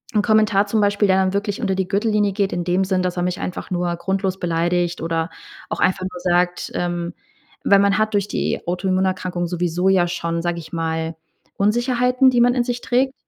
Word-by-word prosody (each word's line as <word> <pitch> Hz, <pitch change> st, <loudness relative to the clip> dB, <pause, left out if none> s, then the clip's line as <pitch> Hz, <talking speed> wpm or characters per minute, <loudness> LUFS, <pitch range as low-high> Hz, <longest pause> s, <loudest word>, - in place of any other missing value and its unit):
'n 210 Hz, -, +4 dB
Kommentar 215 Hz, -2 st, +3 dB
zum 215 Hz, +2 st, +1 dB
Beispiel, 205 Hz, 0 st, +2 dB
der 190 Hz, -, +4 dB
dann 190 Hz, 0 st, +1 dB
wirklich 200 Hz, +1 st, -2 dB
unter 195 Hz, -6 st, 0 dB
die 190 Hz, -1 st, -1 dB
Gürtellinie 210 Hz, 0 st, +1 dB
geht 195 Hz, 0 st, -1 dB
in 175 Hz, -, -2 dB
dem 180 Hz, +2 st, +1 dB
Sinn, 185 Hz, -1 st, 0 dB
dass 180 Hz, 0 st, -2 dB
er 175 Hz, -, 0 dB
mich 180 Hz, 0 st, -2 dB
einfach 180 Hz, -, -5 dB
nur 175 Hz, -1 st, 0 dB
grundlos 190 Hz, +1 st, -2 dB
beleidigt 175 Hz, 0 st, 0 dB
oder 165 Hz, 0 st, -1 dB, 0.4 s
auch -, -, -3 dB
einfach 185 Hz, 0 st, +2 dB
nur 180 Hz, -1 st, -9 dB
sagt, 180 Hz, 0 st, 0 dB
ähm 175 Hz, -1 st, -2 dB, 0.6 s
weil 200 Hz, -, +7 dB
man 200 Hz, 0 st, +3 dB
hat 215 Hz, 0 st, 0 dB
durch 205 Hz, 0 st, 0 dB
die -, -, -1 dB
Autoimmunerkrankung 185 Hz, 0 st, -1 dB
sowieso 175 Hz, +1 st, 0 dB
ja 185 Hz, -2 st, +3 dB
schon, 170 Hz, -1 st, -2 dB
sage 175 Hz, 0 st, -2 dB
ich 160 Hz, -, -11 dB
mal, 160 Hz, -1 st, -2 dB, 0.4 s
Unsicherheiten, 250 Hz, +4 st, +3 dB
die 245 Hz, -2 st, +2 dB
man 245 Hz, +1 st, +5 dB
in 245 Hz, -, +2 dB
sich 245 Hz, 0 st, -3 dB
trägt. 260 Hz, +2 st, +1 dB
190 Hz, 205 wpm, -21 LUFS, 175-205 Hz, 0.6 s, weil